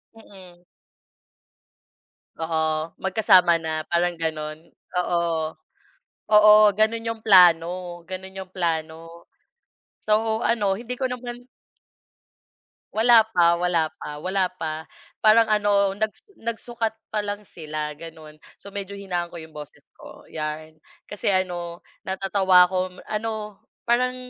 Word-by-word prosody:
Mm. 185 -5 -16 1.8
Oo, 160 0 -2 0.4
magkasama 190 -3 +4
na 155 -1 -3
parang 175 0 +1
gano'n, 155 -2 -3 0.4
oo 175 -1 0 1.1
oo 210 0 +8 0.3
gano'n 225 +1 +1
'yong 230 -1 -4
plano 180 -5 +7 0.4
gano'n 190 +1 -8
'yong 190 -1 -8
plano. 165 -3 -1 1.1
So, 220 +1 +1
ano 210 -4 +1
hindi 245 +1 -6
ko 260 - -3
naman 245 0 -7 1.5
Wala 225 0 +6
pa 170 -1 +4
wala 170 -3 +1
pa 150 - -7
wala 190 0 +1
pa, 160 0 -5 0.3
parang 220 +1 +6
ano 205 -2 +2
nag 210 +3 -1 0.3
nagsukat 230 -1 -3 0.2
pa 215 - -1
lang 205 0 -4
sila 155 -5 -6
gano'n. 155 -2 -12 0.2
So, 200 - -13
medyo 200 0 -6
hinaan 180 -3 -3
ko 170 - -14
'yong 160 -1 -9
boses 150 -1 -11 0.2
ko - - -13
'yan. 155 0 -6 0.2
Kasi 205 - -6
ano 175 -3 -1 0.2
natatawa 190 -1 +4
ako, 185 0 -2
ano 215 -1 -5 0.3
parang 250 +2 +2
190 Hz, 115 wpm, -23 LUFS, 170-215 Hz, 1.8 s, oo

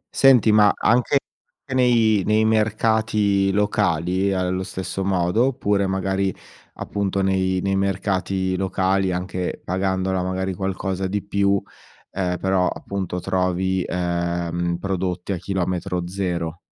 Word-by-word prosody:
Senti, 130 -5 +6
ma 105 -1 +6
anche 125 +5 +3 0.5
che 135 - -6
nei 115 -5 +3
nei 110 +2 +2
mercati 110 -2 +2
locali 95 -3 +1
è - - 0
allo 95 0 -1
stesso 95 0 -4
modo? 95 +5 +2
Oppure 100 -6 0
magari, 95 0 0 0.4
appunto, 100 -1 -2
nei 95 -1 +1
nei 95 0 +1
mercati 95 -1 -1
locali, 95 0 0
anche 90 0 -3
pagandola 95 0 0
magari 95 +1 -2
qualcosa 95 0 -2
di 100 +1 -2
più, 100 -1 +1 0.5
ehm, 90 -2 -1
però 95 -1 +1
appunto 95 -2 -4
trovi, 95 +1 0
ehm, 85 -1 -1
prodotti 95 0 -3
a 95 - -1
chilometro 90 -1 -2
zero? 90 -3 -3
95 Hz, 120 wpm, -22 LUFS, 90-100 Hz, 0.5 s, Senti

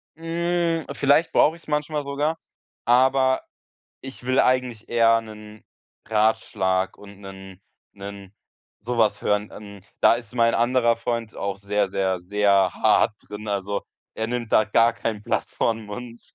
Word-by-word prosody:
hm, 170 0 -1
vielleicht 145 +4 +3
brauche 160 - +4
ich 170 - -15
es - - -16
manchmal 150 0 -1
sogar, 145 +3 -1 0.5
aber 130 +2 +3 0.6
ich 135 -2 -10
will 130 +1 +3
eigentlich 125 -3 0
eher 115 -1 +4
'nen 105 -1 -12 0.5
Ratschlag 105 -4 +1
und 100 -1 -14
'nen 95 -1 -11 0.3
'nen 100 -1 -10 0.5
so 120 +2 -4
was 110 -2 +2
hören. 105 0 0
Hm, 100 -2 -11 0.2
da - - +6
ist 120 -1 -8
mein 115 -1 +3
anderer 120 -1 +2
Freund 115 -1 -3
auch 100 -1 -3
sehr, 100 +1 0
sehr, 95 -1 -1
sehr 100 0 +2
hart - - +3 0.2
drin, 105 +1 -8
also, 100 0 -2 0.3
er 110 - -2
nimmt 120 -1 -4
da 110 - +5
gar 115 +2 +3
kein 110 -2 -4
Blatt - - -2
vor - - 0
'n 115 -1 -5
Mund. 120 +3 -8
115 Hz, 155 wpm, -23 LUFS, 100-130 Hz, 0.6 s, da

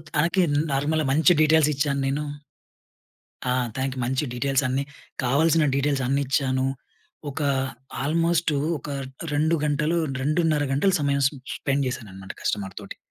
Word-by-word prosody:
తనకి 170 +5 +3
న్ - - +3
నార్మల్‌‌గా 150 +2 +1
మంచి 160 +5 +5
డీటెయిల్స్ 155 -1 +4
ఇచ్చాను 140 -1 0
నేను. 145 +2 -1 1.3
ఆ! - - +3 0.2
తనకి 130 0 -2
మంచి 130 +4 0
డీటెయిల్స్ 135 +2 +1
అన్నీ, 130 +2 0 0.4
కావాల్సిన 155 +5 +3
డీటెయిల్స్ 140 -1 +1
అన్నిచ్చాను. 135 -1 +1 0.6
ఒక 140 - -4 0.6
ఆల్మోస్టు, 165 +2 +1 0.2
ఒక, 145 - -10 0.5
2 155 +3 +2
గంటలు, 150 +3 +1 0.2
2:30 155 +1 +1
గంటలు 170 +8 +2
సమయం 140 -1 +1
స్ - - +3 0.3
స్పెండ్ 140 0 0
జేశాననమాట 100 -7 -6
కస్టమర్ 95 -3 -2
తోటి. 100 - -9
140 Hz, 130 wpm, -24 LUFS, 135-155 Hz, 1.3 s, మంచి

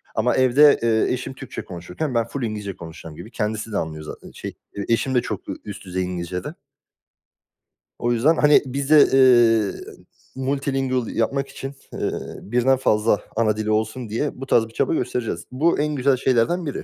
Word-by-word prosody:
Ama - - +2
evde, 135 +3 +5
eee, 115 0 +2
eşim 130 +1 -4
Türkçe 130 -1 -8
konuşurken 90 - -5
ben 115 -1 +1
full 135 +2 -5
İngilizce 105 -4 -4
konuşacağım 80 -1 -10
gibi. 90 +8 -10
Kendisi 110 -1 -3
de 105 - -1
anlıyor 80 -1 -4
zaten, 75 - -10
şey, - - -7 0.2
eee 100 - -4
eşim 115 +3 +1
de 125 - +4
çok - - -6
ü - - -2
üst 100 -1 -8
düzey 95 0 -2
İngilizce 90 0 -4
de. - - -6 1.5
O 120 - 0
yüzden 125 +8 +3
hani 150 0 +6
biz 135 +1 -3
de, 150 -1 +8
eee, 120 -5 +4 0.5
multilingual 135 -2 -1
yapmak 135 +6 -1
için, 135 +1 -8 0.2
eee, - - -2 0.3
birden 125 +5 +2
fazla 105 -4 +2
ana 110 -2 +1
dili 110 0 -1
olsun 110 +2 -1
diye 130 +5 -3
bu - - -4
tarz 115 -4 +3
bir 115 - -18
çaba - - 0
göstereceğiz. 120 - -2
Bu 155 +7 +1
en 150 0 0
güzel 135 0 +2
şeylerden 130 +8 +1
biri, 145 - -4
120 Hz, 180 wpm, -22 LUFS, 105-135 Hz, 1.5 s, de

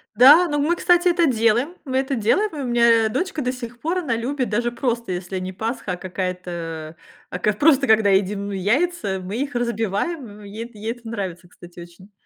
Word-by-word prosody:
Да, 295 +8 +8
но 295 0 0
мы, 320 +5 +2
кстати, 350 +1 +3
это 345 -1 +3
делаем, 240 +4 +1
мы 260 -1 -1
это 270 0 0
делаем, 245 - +2
и 295 - -5
у 265 - -3
меня, 235 -2 +4
дочка 340 - -2
до 250 0 -1
сих 240 -1 -8
пор, 345 +4 -1
она 255 -10 -1
любит, 255 0 -2
даже 240 +3 0
просто 235 -5 -2
если 180 +1 -4
не 185 +1 -5
Пасха, 220 -1 -3
а - - -2
какая-то, 175 -3 -5 0.3
а 180 - -5
как 210 +2 0
просто 280 -2 +4
когда 220 -2 +4
едим 200 +1 +1
ну 205 - -5
яйца, 205 - 0
мы 200 +5 -5
их 280 -1 -3
разбиваем, 235 - -2
м, - - -12
ей 220 +4 -7
ей 215 +2 -4
это 235 -1 -10
нравится, 185 -6 -5
кстати, 175 0 -15
очень. 175 +4 -13
230 Hz, 205 wpm, -22 LUFS, 190-270 Hz, 0.3 s, Да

